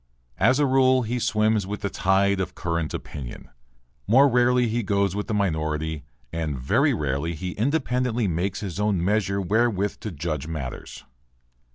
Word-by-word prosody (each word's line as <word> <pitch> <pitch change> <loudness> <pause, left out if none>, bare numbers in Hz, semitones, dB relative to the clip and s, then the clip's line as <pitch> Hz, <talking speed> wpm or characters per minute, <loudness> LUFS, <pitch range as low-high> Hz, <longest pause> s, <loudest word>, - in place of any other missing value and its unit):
As 125 +7 +4
a 145 - +3
rule 130 -1 +4
he 120 +2 -2
swims 110 -3 +1
with 105 +1 -5
the 100 - -1
tide 95 +1 +2
of 90 -1 -3
current 85 -3 -2
opinion; 65 -5 -7 0.6
more 130 +7 +6
rarely 125 -1 +3
he 115 +2 0
goes 100 -2 0
with 105 - -3
the 115 - -2
minority 80 -5 -1 0.3
and 80 -4 -2
very 65 +1 +2
rarely 75 +3 -2
he 90 +4 -4
independently 125 - 0
makes 90 +3 -2
his 95 -3 -5
own 100 -5 +1
measure 100 -1 +1
wherewith 105 0 0
to 110 - -5
judge 75 -4 -4
matters. 70 -6 -6
100 Hz, 160 wpm, -24 LUFS, 85-115 Hz, 0.6 s, more